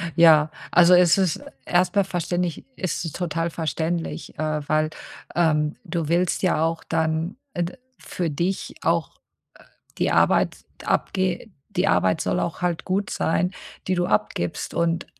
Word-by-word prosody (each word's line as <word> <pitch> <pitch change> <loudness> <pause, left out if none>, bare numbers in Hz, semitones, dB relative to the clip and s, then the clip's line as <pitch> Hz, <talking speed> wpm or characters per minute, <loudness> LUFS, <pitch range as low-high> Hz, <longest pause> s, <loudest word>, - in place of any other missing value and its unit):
Ja, 155 -3 +6 0.2
also 180 0 +6
es 180 -1 +6
ist 185 -5 +1
e - - -13 0.2
erst 180 +1 +2
mal 200 - +5
verständlich 175 -2 -2
es 180 -2 -3
ist 165 - -5
total 165 -1 -1
verständlich, 165 +1 -3
äh, 155 -1 -1
weil, 155 0 +2 0.5
ähm, 155 -3 +2
du 170 -3 -2
willst 175 +2 +1
ja 175 -3 +2
auch 165 0 -1
dann, 160 +3 -1 0.2
äh, 175 -3 0
d 170 - -5 0.2
für 175 -2 -3
dich 175 +6 -2
auch, - - 0
äh, - - -44 0.8
die - - +1
Arbeit - - +3 0.3
abge 185 +1 0 0.2
die 180 +3 0
Arbeit 95 - +2
soll 90 - 0
auch 170 - -3
halt 175 -2 -1
gut 195 +2 -1
sein, 180 +3 0 0.3
die 185 - +1
du 175 -1 +1
abgibst 105 -5 -1
und 170 0 0
170 Hz, 160 wpm, -24 LUFS, 160-180 Hz, 0.8 s, Ja